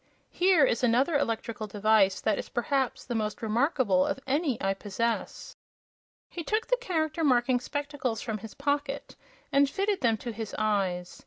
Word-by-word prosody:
Here 355 Hz, -5 st, +4 dB
is 235 Hz, -1 st, 0 dB
another 250 Hz, +7 st, +3 dB
electrical 230 Hz, -5 st, -2 dB
device 205 Hz, -2 st, +3 dB
that 215 Hz, -2 st, +1 dB
is, -, -, -6 dB
perhaps, 260 Hz, +1 st, -1 dB
the 245 Hz, -, -4 dB
most 215 Hz, -1 st, -2 dB
remarkable 225 Hz, -, +2 dB
of -, -, -2 dB
any 280 Hz, -2 st, 0 dB
I 195 Hz, 0 st, +1 dB
possess." 215 Hz, +4 st, -3 dB, 0.7 s
He 340 Hz, -, -6 dB
took 435 Hz, +6 st, 0 dB
the -, -, +1 dB
Character 325 Hz, -8 st, -1 dB
Marking 250 Hz, -2 st, +3 dB
spectacles 285 Hz, -4 st, -3 dB
from 220 Hz, -2 st, -4 dB
his 220 Hz, +1 st, -10 dB
pocket 285 Hz, 0 st, -2 dB, 0.4 s
and 280 Hz, 0 st, +4 dB
fitted 395 Hz, +4 st, -1 dB
them 230 Hz, -3 st, +2 dB
to 235 Hz, +3 st, -5 dB
his 220 Hz, -1 st, -6 dB
eyes. 195 Hz, -5 st, -1 dB
245 Hz, 160 wpm, -28 LUFS, 215-285 Hz, 0.7 s, Here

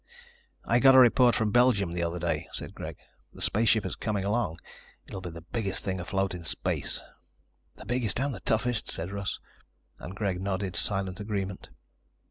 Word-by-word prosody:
"I 120 Hz, -, +3 dB
got 135 Hz, +1 st, +7 dB
a -, -, +9 dB
report 125 Hz, -1 st, +7 dB
from 110 Hz, -2 st, +1 dB
Belgium 120 Hz, -7 st, +4 dB
the 85 Hz, 0 st, -2 dB
other 85 Hz, +1 st, -1 dB
day," 85 Hz, 0 st, -2 dB
said -, -, -6 dB
Greg. -, -, -7 dB, 0.4 s
"The -, -, -11 dB
spaceship 110 Hz, 0 st, +3 dB
is -, -, -3 dB
coming 105 Hz, -3 st, -2 dB
along. 100 Hz, -6 st, 0 dB, 0.5 s
It'll 95 Hz, -, -7 dB
be 90 Hz, -, -5 dB
the 85 Hz, 0 st, -9 dB
biggest 100 Hz, -5 st, -1 dB
thing 95 Hz, -2 st, -2 dB
afloat 95 Hz, +1 st, -1 dB
in 90 Hz, -1 st, -6 dB
space." -, -, -2 dB, 0.8 s
"The -, -, -12 dB
biggest 120 Hz, 0 st, -1 dB
and 140 Hz, +1 st, 0 dB
the 105 Hz, -, -6 dB
toughest," 110 Hz, +4 st, 0 dB
said 85 Hz, +4 st, -3 dB
Russ, 100 Hz, -1 st, -3 dB, 0.6 s
and 90 Hz, +4 st, -8 dB
Greg 95 Hz, -3 st, -1 dB
nodded 95 Hz, -2 st, -2 dB
silent 95 Hz, 0 st, 0 dB
agreement. 100 Hz, -2 st, -4 dB
100 Hz, 175 wpm, -28 LUFS, 95-115 Hz, 0.8 s, a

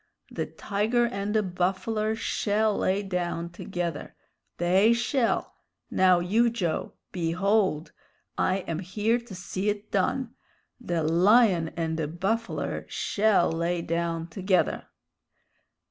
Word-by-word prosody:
The -, -, -3 dB
tiger 220 Hz, +4 st, 0 dB
and 205 Hz, -2 st, -3 dB
the 215 Hz, -, +3 dB
buffler 195 Hz, +4 st, -1 dB
shell 215 Hz, -1 st, 0 dB
lay 195 Hz, +2 st, +1 dB
down 175 Hz, -3 st, -3 dB
together. 170 Hz, -3 st, -5 dB, 0.4 s
They 190 Hz, +6 st, +4 dB
shell! 235 Hz, +1 st, 0 dB, 0.4 s
Now, 185 Hz, -1 st, +4 dB
you, 220 Hz, +7 st, +2 dB
Joe! 180 Hz, -9 st, -2 dB, 0.2 s
Behold! 180 Hz, -1 st, 0 dB, 0.4 s
I 190 Hz, +1 st, +1 dB
am 165 Hz, -1 st, -2 dB
here 210 Hz, +6 st, 0 dB
to 235 Hz, -5 st, -11 dB
see 185 Hz, +2 st, -3 dB
it 205 Hz, 0 st, -4 dB
done. 230 Hz, +5 st, 0 dB, 0.5 s
The 175 Hz, -9 st, -2 dB
lion 180 Hz, +2 st, +4 dB
and 160 Hz, -1 st, -1 dB
the 155 Hz, -, -1 dB
buffler 195 Hz, +8 st, -2 dB
shell 210 Hz, -5 st, +2 dB
lay 170 Hz, +1 st, -1 dB
down 165 Hz, 0 st, -2 dB
together!" 185 Hz, +2 st, 0 dB
190 Hz, 115 wpm, -27 LUFS, 170-215 Hz, 0.5 s, They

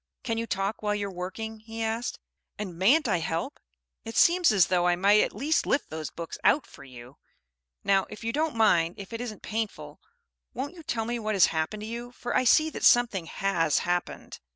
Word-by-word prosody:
"Can 230 Hz, -3 st, -2 dB
you 230 Hz, -, -3 dB
talk 195 Hz, +1 st, -2 dB
while 210 Hz, -1 st, 0 dB
you're 200 Hz, -1 st, -3 dB
working?" 220 Hz, +5 st, -6 dB
he 225 Hz, +1 st, -6 dB
asked. 225 Hz, +2 st, -2 dB, 0.4 s
"And 190 Hz, -5 st, -5 dB
mayn't 245 Hz, -, +4 dB
I 195 Hz, -, +2 dB
help? 165 Hz, -, -3 dB, 0.4 s
It 225 Hz, 0 st, -6 dB
seems 350 Hz, -1 st, +5 dB
as 195 Hz, -5 st, +5 dB
though 180 Hz, -1 st, +1 dB
I 175 Hz, -, +3 dB
might 200 Hz, +4 st, +4 dB
at -, -, -1 dB
least 290 Hz, +9 st, 0 dB
lift 280 Hz, -, 0 dB
those 155 Hz, -1 st, -5 dB
books 170 Hz, -1 st, -8 dB
out 295 Hz, -, +4 dB
for -, -, -15 dB
you. 125 Hz, 0 st, -13 dB, 0.7 s
Now, 195 Hz, -1 st, +2 dB
if 210 Hz, -, -10 dB
you 230 Hz, 0 st, -2 dB
don't 310 Hz, -2 st, -1 dB
mind, 175 Hz, -7 st, +3 dB
if 200 Hz, +3 st, -9 dB
it 230 Hz, -, -4 dB
isn't 225 Hz, -4 st, -7 dB
painful, 220 Hz, -1 st, -4 dB, 0.6 s
won't 280 Hz, +6 st, -4 dB
you 350 Hz, -, -12 dB
tell 230 Hz, -7 st, -2 dB
me 240 Hz, +1 st, -2 dB
what 215 Hz, -1 st, -2 dB
has 190 Hz, -, +7 dB
happened 160 Hz, +7 st, -2 dB
to -, -, -5 dB
you, 240 Hz, +2 st, -6 dB
for 240 Hz, 0 st, -4 dB
I 255 Hz, -, +3 dB
see 310 Hz, +6 st, +4 dB
that -, -, -7 dB
something 230 Hz, -9 st, +4 dB
has 165 Hz, -6 st, 0 dB
happened." 175 Hz, 0 st, -3 dB
215 Hz, 210 wpm, -27 LUFS, 180-240 Hz, 0.7 s, has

